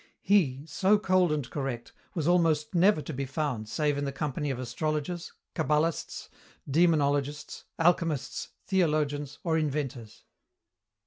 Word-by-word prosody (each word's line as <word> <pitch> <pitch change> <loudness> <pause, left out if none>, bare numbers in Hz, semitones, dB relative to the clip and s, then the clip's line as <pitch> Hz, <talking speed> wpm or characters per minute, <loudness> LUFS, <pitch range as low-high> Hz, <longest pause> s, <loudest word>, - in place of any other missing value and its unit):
He, 150 -9 +2
so 190 +7 +3
cold 185 -4 +3
and 145 -5 -1
correct, 130 -4 -4 0.2
was 160 -3 -1
almost 165 -4 +2
never 180 -2 +4
to 160 - -6
be 135 +1 -3
found 130 -7 -2
save 145 0 0
in - - -2
the 140 - -2
company 145 +1 -2
of 135 - -2
astrologers, 155 +6 -3 0.2
cabbalists, 155 0 0 0.4
demonologists, 145 -2 +1
alchemists, 165 -5 +1 0.2
theologians, 150 -6 0
or 160 -2 +2
inventors. 135 -7 -3
150 Hz, 125 wpm, -29 LUFS, 140-165 Hz, 0.4 s, never